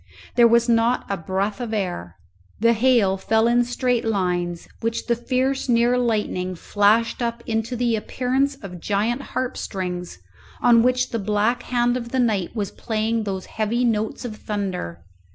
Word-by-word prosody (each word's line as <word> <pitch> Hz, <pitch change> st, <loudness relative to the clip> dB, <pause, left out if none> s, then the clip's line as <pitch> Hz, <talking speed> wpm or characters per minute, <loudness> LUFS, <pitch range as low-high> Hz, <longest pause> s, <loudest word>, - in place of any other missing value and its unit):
There 240 Hz, -1 st, +7 dB
was 235 Hz, +1 st, +4 dB
not 235 Hz, +1 st, +2 dB
a -, -, +1 dB
breath 195 Hz, +5 st, -2 dB
of 225 Hz, -2 st, -3 dB
air. 135 Hz, -, -3 dB, 0.4 s
The 230 Hz, +2 st, +4 dB
hail 225 Hz, -5 st, +3 dB
fell 220 Hz, +3 st, +2 dB
in 240 Hz, +1 st, +4 dB
straight 245 Hz, 0 st, 0 dB
lines, 180 Hz, -5 st, -1 dB
which 230 Hz, 0 st, -2 dB
the 235 Hz, -, +2 dB
fierce 260 Hz, +3 st, -1 dB
near 240 Hz, +1 st, +4 dB
lightning 210 Hz, -6 st, -1 dB
flashed 210 Hz, +7 st, +2 dB
up 235 Hz, 0 st, -2 dB
into 225 Hz, +2 st, -2 dB
the 240 Hz, -1 st, +1 dB
appearance 260 Hz, +5 st, 0 dB
of 180 Hz, -3 st, -8 dB
giant 215 Hz, +7 st, 0 dB
harp 255 Hz, -2 st, -3 dB
strings, 180 Hz, -, -4 dB, 0.4 s
on 235 Hz, -1 st, +5 dB
which 250 Hz, +1 st, +1 dB
the 230 Hz, -, -1 dB
black 215 Hz, +4 st, +1 dB
hand 245 Hz, 0 st, +1 dB
of 235 Hz, -1 st, -6 dB
the 260 Hz, -, -1 dB
night 215 Hz, -7 st, 0 dB
was 205 Hz, -4 st, -2 dB
playing 220 Hz, 0 st, -1 dB
those 190 Hz, -2 st, -3 dB
heavy 225 Hz, +3 st, -1 dB
notes 220 Hz, +1 st, -1 dB
of 215 Hz, -3 st, -6 dB
thunder. 185 Hz, -, -4 dB
225 Hz, 165 wpm, -23 LUFS, 200-240 Hz, 0.4 s, There